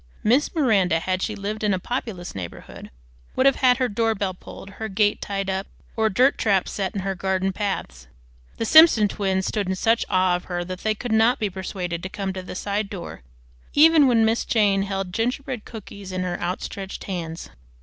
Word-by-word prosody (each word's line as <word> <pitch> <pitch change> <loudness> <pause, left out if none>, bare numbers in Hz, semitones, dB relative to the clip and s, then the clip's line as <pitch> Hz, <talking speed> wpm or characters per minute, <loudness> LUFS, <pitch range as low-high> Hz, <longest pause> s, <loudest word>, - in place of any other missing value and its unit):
Miss 260 +10 +2
Miranda, 200 - +3
had 185 +2 -2
she 215 - -2
lived 210 +2 -4
in 205 -2 +2
a - - -3
populous 200 -5 -5
neighborhood, 90 -3 -8 0.5
would 260 - +2
have 275 - +5
had 255 -2 +4
her 255 -1 +1
doorbell 210 -3 0
pulled, 195 +2 -11
her 220 - -3
gate 205 +1 +1
tied 195 -1 -3
up, 190 0 -2 0.3
or 220 -1 +2
"dirt 255 +7 +3
traps" 195 -4 +1
set 195 0 -3
in 195 - -1
her 195 0 -2
garden 190 +1 -1
paths. 70 - -4 0.5
The 225 - -2
Simpson 310 -6 +7
twins 190 -2 -1
stood 205 -3 -2
in 190 - 0
such 225 +5 +2
awe 185 -1 +3
of 180 - -5
her 175 -1 -3
that 185 +1 -6
they 215 +2 0
could 240 +2 -5
not 225 +3 +4
be 210 -3 -2
persuaded 180 -2 -4
to 185 - -5
come 195 -1 -4
to 185 - -5
the 185 - -8
side 200 +1 -2
door 180 - -8 0.5
even 310 -1 +7
when 230 -3 +4
Miss 225 +1 +1
Jane 205 -4 +2
held 195 -2 -3
gingerbread 245 +2 -2
cookies 200 -3 -9
in 185 0 -2
her 180 -1 -3
outstretched 190 +2 -5
hands. 170 -3 -6
200 Hz, 200 wpm, -23 LUFS, 185-225 Hz, 0.5 s, Simpson